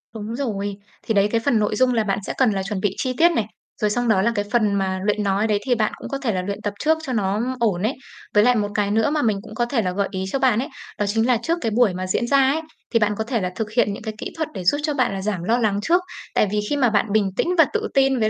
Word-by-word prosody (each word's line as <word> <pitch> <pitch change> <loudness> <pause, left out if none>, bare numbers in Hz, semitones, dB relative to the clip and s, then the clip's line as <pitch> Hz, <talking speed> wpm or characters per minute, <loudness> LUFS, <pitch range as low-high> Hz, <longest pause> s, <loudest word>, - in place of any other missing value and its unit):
Đúng 220 +1 -5
rồi. 205 -7 -3 0.3
Thì 225 - -1
đấy, 200 -2 +4
là 205 - 0
cái 230 - +2
phần 240 -6 +3
nội 210 0 0
dung 255 +2 +3
là 225 -2 +2
bạn 195 -1 -1
sẽ - - -2
cần 255 -4 +4
là 195 -1 -2
chuẩn 200 0 -3
bị 195 0 -1
chi 255 - -1
tiết 340 +1 +5
này. 230 -10 0 0.4
Rồi 210 - +2
xong 245 +3 0
đó 205 -4 +3
là 235 - +2
cái 205 - -1
phần 215 -4 +2
mà 190 -1 -1
luyện 210 0 +1
nói 200 +2 +1
đấy 210 -2 +1
thì 250 -2 +2
bạn 215 -2 +1
cũng - - -8
có 275 - -2
thể 235 -6 -1
là 185 - -1
luyện 200 +2 -5
tập 205 - -2
trước 315 +1 +2
cho 265 -5 -3
nó 215 +5 0
ổn 205 -5 +1
ấy. 225 - +1 0.4
Với 210 - +6
lại 245 +1 +4
một 210 -2 +1
cái 205 -1 +1
nữa 220 +5 +2
mà 300 0 0
mình 215 -5 +1
cũng 220 -1 -11
có 240 - +1
thể 240 -1 0
là 185 -3 -1
gợi 200 +1 -1
ý 190 -1 -3
cho 275 - 0
bạn 250 -5 +3
ấy, 265 - -2 0.3
đó 205 - 0
chính 225 +4 +1
là 250 - +4
trước 335 +1 0
cái 225 - -1
buổi 225 -3 +3
mà 185 +1 -4
diễn 235 +6 0
ra 280 - +4
ấy, 275 +4 +3 0.3
thì 230 - +5
bạn 210 -1 +1
có 220 - -1
thể 230 -2 -1
là 180 - -2
thực 215 -1 -3
hiện 215 -3 +2
những 200 - -8
cái 220 -1 -4
kỹ - - -5
thuật 315 -1 -1
để 185 - -5
giúp 290 +11 +3
cho 300 - 0
bạn 255 -7 +1
là 195 - -4
giảm 195 -4 -2
lo 225 +6 +2
lắng 215 -4 +1
trước. 345 +9 +3 0.3
Tại - - +3
vì 210 - +1
khi 290 - 0
mà 250 -4 +3
bạn 210 0 +2
bình 205 -2 +2
tĩnh - - +1
và 325 - +7
tự 440 0 -1
tin 270 -2 +3
với 215 - +2
220 Hz, 325 wpm, -22 LUFS, 205-250 Hz, 0.4 s, và